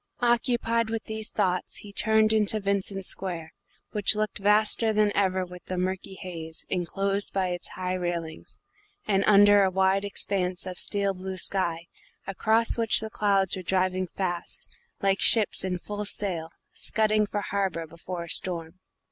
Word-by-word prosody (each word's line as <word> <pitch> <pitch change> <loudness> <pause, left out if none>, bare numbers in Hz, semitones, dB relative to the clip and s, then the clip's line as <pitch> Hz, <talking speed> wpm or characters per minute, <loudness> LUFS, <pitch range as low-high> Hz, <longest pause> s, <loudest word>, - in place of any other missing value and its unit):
Occupied 235 -1 +1
with 225 0 -3
these 220 0 -5
thoughts, 185 -3 -1
he 205 -1 -10
turned 220 +1 +3
into 215 0 +1
Vincent 195 -1 -1
Square, 175 -5 -3 0.4
which 210 0 +2
looked 215 0 -2
vaster 210 +2 +3
than 210 -1 +3
ever 190 -2 +1
with 180 0 -12
the 185 - -4
murky 185 +1 -3
haze, 165 -4 -7
enclosed 195 +2 -1
by 190 -2 0
its 175 0 -3
high 185 0 -4
railings, 175 -3 -4 0.5
and 195 -2 +2
under 205 0 +7
a 190 - +3
wide 190 +1 +2
expanse 190 -2 -1
of 185 -1 -2
steel 200 -1 0
blue 190 0 -6
sky, 170 -3 0 0.4
across 220 +4 +2
which 225 -1 +3
the 220 0 -6
clouds 200 -3 +1
were 190 - -5
driving 185 0 0
fast 175 -2 -2 0.4
like 195 0 +2
ships 220 -3 +6
in 185 -1 -2
full 205 +3 -6
sail 180 -6 -2 0.2
scudding 215 -1 +1
for 205 0 -3
harbour 190 -5 -2
before 170 +2 -7
a - - -10
storm. 170 -1 -2
195 Hz, 155 wpm, -26 LUFS, 180-210 Hz, 0.5 s, under